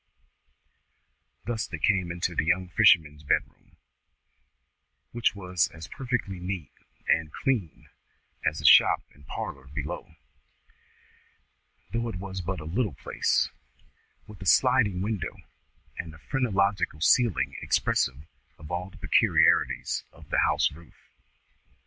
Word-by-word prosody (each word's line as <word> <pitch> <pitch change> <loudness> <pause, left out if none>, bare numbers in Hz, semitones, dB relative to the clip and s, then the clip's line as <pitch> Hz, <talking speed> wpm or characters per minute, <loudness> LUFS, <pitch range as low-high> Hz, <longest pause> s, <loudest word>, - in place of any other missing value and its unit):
Thus 115 -1 -2
they - - -6
came 95 -4 +1
into 85 +1 -2
the - - 0
young 90 +2 +1
fisherman's 75 -3 +4
bedroom, 75 - -2 1.3
which 120 -3 0
was 90 -3 0
as 80 -1 -10
perfectly 125 -8 -3
neat 90 -5 -5 0.4
and 80 -2 +2
clean 110 - -2 0.6
as 75 +1 0
the - - -6
shop - - +7
and 70 -1 -20
parlour 65 -1 -6
below; 80 +3 -6 1.8
though 115 0 -1
it 110 - -6
was 95 0 -5
but 90 +2 -4
a 75 - -8
little 105 +7 -1
place, - - 0 0.7
with 105 -2 -13
a 95 - -6
sliding 115 -6 +4
window, 105 -4 -3 0.6
and 80 -2 -6
a - - -14
phrenological 100 - 0
ceiling 110 - +3
expressive 65 +4 0 0.3
of 75 0 -11
all 90 +2 -3
the - - -16
peculiarities - - +3
of - - -17
the - - +3
house - - +2
roof. 80 +2 -18
90 Hz, 125 wpm, -27 LUFS, 80-105 Hz, 1.8 s, shop